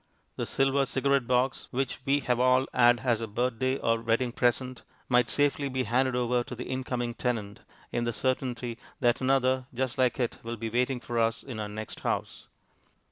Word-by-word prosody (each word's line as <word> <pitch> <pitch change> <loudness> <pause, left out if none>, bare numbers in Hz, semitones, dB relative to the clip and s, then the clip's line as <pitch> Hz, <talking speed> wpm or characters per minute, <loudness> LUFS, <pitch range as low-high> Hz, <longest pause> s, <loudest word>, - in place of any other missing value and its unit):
The - - -3
silver 135 0 +2
cigarette 135 -1 +1
box, 125 +1 +1
which 130 -1 -2
we 140 +1 +2
have 125 -2 0
all 130 +1 +4
had 120 -1 +5
as 120 -3 +1
a 115 - -3
birthday 125 +4 0
or 115 -2 +1
wedding 115 +2 +1
present, 125 +1 0 0.3
might 125 -2 +3
safely 145 -1 +1
be 130 0 -1
handed 130 +1 +1
over 125 0 +1
to 125 - -7
the 125 - -5
incoming 125 -2 -3
tenant, 110 -5 -2 0.3
in 120 - -1
the 120 - 0
certainty 125 -1 -2 0.2
that 120 -2 +2
another 130 -1 +2
just 130 +1 -2
like 130 +1 +2
it 120 -2 -1
will 115 0 -5
be 115 0 -4
waiting 125 +2 +1
for 120 -1 -2
us 115 0 +1
in 125 -5 -7
our 105 -1 -3
next 110 +1 -7
house. - - -3
125 Hz, 190 wpm, -28 LUFS, 120-130 Hz, 0.3 s, had